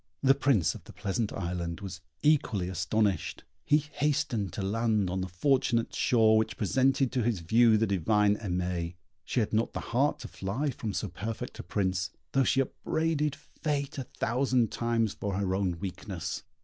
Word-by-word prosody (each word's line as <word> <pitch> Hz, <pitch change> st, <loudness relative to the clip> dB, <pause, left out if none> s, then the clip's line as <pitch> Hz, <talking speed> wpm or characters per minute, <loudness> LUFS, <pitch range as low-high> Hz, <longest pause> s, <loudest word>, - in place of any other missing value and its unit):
The 135 Hz, 0 st, +7 dB
Prince 135 Hz, -, +2 dB
of -, -, -11 dB
the -, -, -12 dB
Pleasant 100 Hz, +2 st, -2 dB
Island 85 Hz, -2 st, -3 dB
was 95 Hz, -2 st, -7 dB, 0.2 s
equally 120 Hz, -, +2 dB
astonished. 100 Hz, +2 st, 0 dB, 0.2 s
He 150 Hz, -, +4 dB
hastened 145 Hz, -, -1 dB
to 100 Hz, -, -3 dB
land 105 Hz, -2 st, +1 dB
on 95 Hz, 0 st, -1 dB
the 95 Hz, -, -2 dB
fortunate 115 Hz, +4 st, +1 dB
shore 110 Hz, -2 st, +4 dB
which 110 Hz, -, -2 dB
presented 130 Hz, +4 st, +2 dB
to 125 Hz, -, 0 dB
his 110 Hz, -5 st, 0 dB
view 110 Hz, +6 st, +5 dB
the 110 Hz, -, +2 dB
divine 100 Hz, +2 st, +2 dB
Aimée. 90 Hz, -3 st, -2 dB, 0.3 s
She 125 Hz, -, +1 dB
had 110 Hz, -, -2 dB
not 110 Hz, +2 st, +1 dB
the -, -, -3 dB
heart 140 Hz, +5 st, +3 dB
to -, -, -6 dB
fly 125 Hz, +10 st, -2 dB
from 115 Hz, -3 st, -4 dB
so 105 Hz, -, -1 dB
perfect 105 Hz, +5 st, -5 dB
a -, -, -5 dB
prince, 95 Hz, -2 st, -1 dB, 0.2 s
though 135 Hz, -, +3 dB
she 135 Hz, +1 st, +3 dB
upbraided 150 Hz, +2 st, -1 dB
fate 140 Hz, -2 st, -3 dB
a 130 Hz, -, -4 dB
thousand 125 Hz, -1 st, +1 dB
times 115 Hz, -2 st, 0 dB
for 100 Hz, -2 st, -3 dB
her 95 Hz, -1 st, 0 dB
own 95 Hz, -3 st, 0 dB
weakness. 90 Hz, -2 st, -5 dB
110 Hz, 175 wpm, -29 LUFS, 95-130 Hz, 0.3 s, The